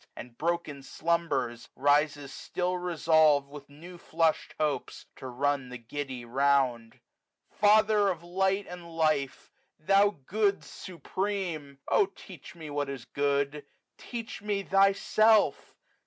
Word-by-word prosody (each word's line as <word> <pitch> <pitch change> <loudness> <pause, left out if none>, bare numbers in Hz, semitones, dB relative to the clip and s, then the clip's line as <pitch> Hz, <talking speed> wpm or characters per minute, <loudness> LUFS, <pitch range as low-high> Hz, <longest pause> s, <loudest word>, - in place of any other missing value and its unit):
And 120 -1 -10
broken 160 -2 -2
slumbers, 140 -6 -2
rises 145 0 +1
still 180 0 -3
resolv'd, 160 -5 +3
215 - - -18
With 145 -1 -11
new 180 0 -10
flush'd 165 -1 0
hopes, 150 -2 -2
to 130 - -8
run 135 +1 -1
the 125 - -7
giddy 130 +1 -6
round. 125 -3 +1 0.5
Father 210 0 +4
of 170 -3 -4
light 190 +3 0
and 170 -2 -10
life, 155 -4 0 0.3
thou 195 +3 +3
Good 200 +2 +1
supreme 180 -5 -5
1 - - +2
O - - +5
teach 190 -2 -13
me 155 -3 -9
what 145 -1 -2
is 135 -4 -7
good! 140 +1 -1 0.4
teach 230 -4 -7
me 205 -1 -2
Thyself 200 +3 +3
155 Hz, 125 wpm, -28 LUFS, 140-190 Hz, 0.5 s, O